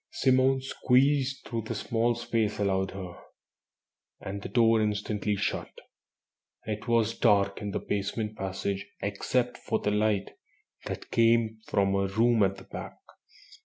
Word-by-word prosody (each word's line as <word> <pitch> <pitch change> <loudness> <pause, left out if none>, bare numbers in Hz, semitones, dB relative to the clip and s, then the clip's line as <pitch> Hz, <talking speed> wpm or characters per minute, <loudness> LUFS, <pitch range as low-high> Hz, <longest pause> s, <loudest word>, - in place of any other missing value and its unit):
Simone 130 0 +3
squeezed 135 +1 +2
through 115 -2 -3
the 110 - -5
small 120 +1 0
space 115 -3 -1
allowed 95 -1 0
her, 95 -2 -8 1.0
and 100 +1 -6
the - - -6
door 115 -2 +4
instantly 105 0 -1
shut. - - -3 0.9
It 105 +2 -4
was 115 -1 +2
dark 100 -1 +3
in 105 - -3
the - - -2
basement 105 +2 -3
passage 95 0 -3 0.2
except 120 +5 -1
for 110 - -1
the 105 - -1
light 105 -2 +1 0.6
that - - -6
came 115 -1 +3
from 100 -1 +2
a 100 0 +1
room 115 +3 +3
at 95 0 +2
the 95 - -11
back. - - -8
110 Hz, 140 wpm, -28 LUFS, 100-120 Hz, 1.0 s, door